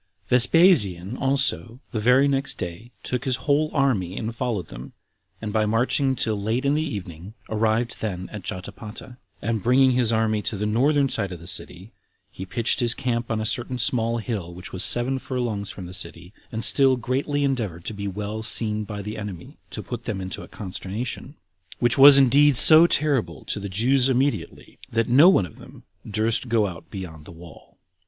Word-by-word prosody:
4. 125 - +5
Vespasian 120 - +3
also, 135 -3 -1
the 110 - -3
very 125 +5 +4
next 135 0 -1
day, 90 +7 -7
took 125 0 -3
his 130 -2 0
whole 150 +1 +2
army 105 -10 0
and 115 0 -4
followed 115 -9 -3
them, - - -10 0.5
and 105 -2 -6
by 110 -1 +2
marching 125 +5 +1
till 110 -4 -2
late 115 +6 -2
in 140 - +2
the 155 - 0
evening, 100 - -7 0.2
arrived 110 +2 -1
then 95 -4 -4
at 105 - -7
Jotapata; 105 +6 -7 0.3
and 110 0 -1
bringing 130 +3 +4
his 125 -2 +1
army 110 -1 0
to 105 - -3
the 105 - -3
northern 135 +6 +2
side 100 -7 -3
of 90 - -8
the 85 - -13
city, 90 +3 -6 0.4
he 95 - -9
pitched 115 +4 -1
his 120 -1 +1
camp 120 -2 -3
on 110 -1 -1
a 110 - -3
certain 120 +3 -3
small 115 -2 0
hill 105 -7 -5
which 90 +1 -11
was 95 - +1
seven 130 +2 +3
furlongs 120 -7 -4
from 95 - -8
the 90 - -10
city, 85 0 -8 0.2
and 110 0 -4
still 135 +3 +5
greatly 135 +4 -2
endeavored 110 -11 -2
to - - -4
be 100 -1 -5
well 105 +3 -5
seen 110 -1 +1
by 105 -1 -7
the 105 +2 -6
enemy, 100 -5 -9
to - - -7
put 120 -1 -7
them 105 -4 -3
into 95 0 -6
a - - -11
consternation; 110 +8 -6 0.4
which 120 +2 +1
was 140 +1 +10
indeed 140 +1 +5
so 160 +5 +9
terrible 135 - 0
to - - -3
the 100 0 -6
Jews 125 +7 +2
immediately, 135 +2 -2
that 115 0 0
no 140 +9 +6
one 145 - +3
of 80 - -14
them - - -15 0.3
durst 110 +4 0
go 115 -2 +2
out 85 -4 -8
beyond 80 -6 -9
the - - -12
wall. 85 0 -15
115 Hz, 190 wpm, -23 LUFS, 100-130 Hz, 0.5 s, was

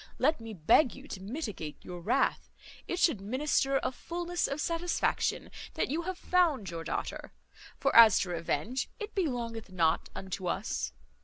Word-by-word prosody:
Let 295 -1 +2
me 225 -1 -7
beg 205 - +4
you 270 +2 -12
to 190 - -7
mitigate 200 - -5
your 175 -1 -7
wrath; - - +1 0.4
it 350 - -2
should 305 - +3
minister 270 +4 +1
a - - 0
fulness 345 +5 -2
of 275 +2 -3
satisfaction 335 +2 0 0.2
that - - 0
you 320 +3 0
have 370 - -4
found 315 - +2
your 165 -1 -5
daughter; 165 - -4 0.4
for - - 0
as 225 -3 +10
to 185 - -2
revenge, 175 - -2
it 425 0 -6
belongeth 235 - -2
not 165 -3 +1
unto 190 -1 -5
us. 195 +4 -2
240 Hz, 160 wpm, -31 LUFS, 190-315 Hz, 0.4 s, as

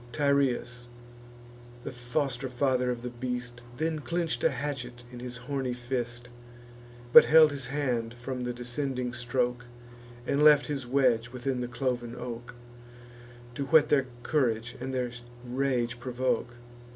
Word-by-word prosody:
Tyrrheus, 125 -3 +1 1.0
the - - -5
foster 130 +1 -2
father 125 0 +1
of 120 -1 -3
the 125 - -4
beast, 125 0 -4 0.2
Then 160 +1 -1
clench'd 165 -5 -2
a - - +5
hatchet 125 -4 -4
in 125 - -9
his 125 0 -6
horny 125 0 -3
fist, 120 -1 -4 0.9
But - - +11
held 155 -1 +7
his 140 -3 -5
hand 125 -5 -1
from 125 +1 -5
the 125 - -2
descending 125 +1 -3
stroke, 125 0 -1 0.6
And 140 +3 +1
left 150 -1 +7
his 140 -5 -3
wedge 125 -3 +2
within 125 0 -2
the 125 - -2
cloven 120 -1 -2
oak, 120 -1 -7 1.0
To 140 +3 -3
whet 155 0 +5
their 135 -3 +3 0.2
courage 120 -6 0
and 130 - -4
their 125 -2 -1 0.3
rage 125 -1 -1
provoke. 125 -1 -1
125 Hz, 140 wpm, -29 LUFS, 120-135 Hz, 1.0 s, But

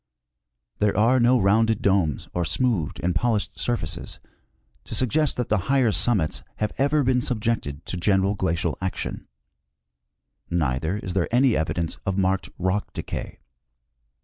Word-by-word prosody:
There 105 -1 +2
are 120 +5 +4
no 120 +1 +4
rounded 110 +3 +2
domes 95 -8 +1
or 90 - 0
smoothed 95 - 0
and 90 +1 +1
polished 110 +4 0
surfaces 120 -10 -3 0.7
to - - -5
suggest 145 +4 +1
that 125 - -2
the 110 - +3
higher 130 -5 +4
summits 100 -7 +1
have 105 -1 -2
ever 145 +2 +3
been 125 -1 +2
subjected 110 - -2
to 90 - -4
general 95 +2 +2
glacial 85 -4 -1
action; 95 0 -4 1.2
neither 80 +2 0
is 95 -3 -5
there 90 -3 0
any 125 0 +4
evidence 80 +1 -2
of 95 -1 -1
marked 95 -1 +1
rock 95 +3 -1
de - - -4
cay. - - -6
100 Hz, 145 wpm, -24 LUFS, 90-120 Hz, 1.2 s, are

